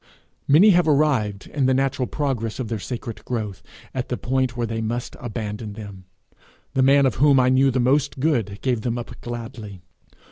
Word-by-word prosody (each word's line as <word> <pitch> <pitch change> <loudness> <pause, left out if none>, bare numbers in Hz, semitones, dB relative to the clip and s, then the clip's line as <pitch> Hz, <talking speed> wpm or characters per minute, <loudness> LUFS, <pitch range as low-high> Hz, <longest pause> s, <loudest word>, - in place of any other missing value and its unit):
Many 175 +10 +7
have 175 -3 +3
arrived, 135 -10 +1
in 140 -3 0
the 130 - +3
natural 135 -1 0
progress 125 -7 -2
of 125 -4 -4
their 115 -2 -2
sacred 115 +1 -6
growth, 110 -6 -4 0.3
at 130 -1 -3
the 125 - -2
point 130 -1 -1
where 120 - 0
they 115 0 -3
must 120 +2 -3
abandon 105 -2 -5
them. 100 -3 -10 0.7
The 130 - +2
man 140 +1 +5
of 130 - 0
whom 140 -2 +6
I 125 0 +4
knew 130 +1 +4
the 130 0 0
most 135 +3 +1
good 120 -9 0
gave 125 -4 0
them 120 +1 -2
up 120 - -8
gladly. 115 -4 -7
125 Hz, 185 wpm, -23 LUFS, 110-135 Hz, 0.7 s, Many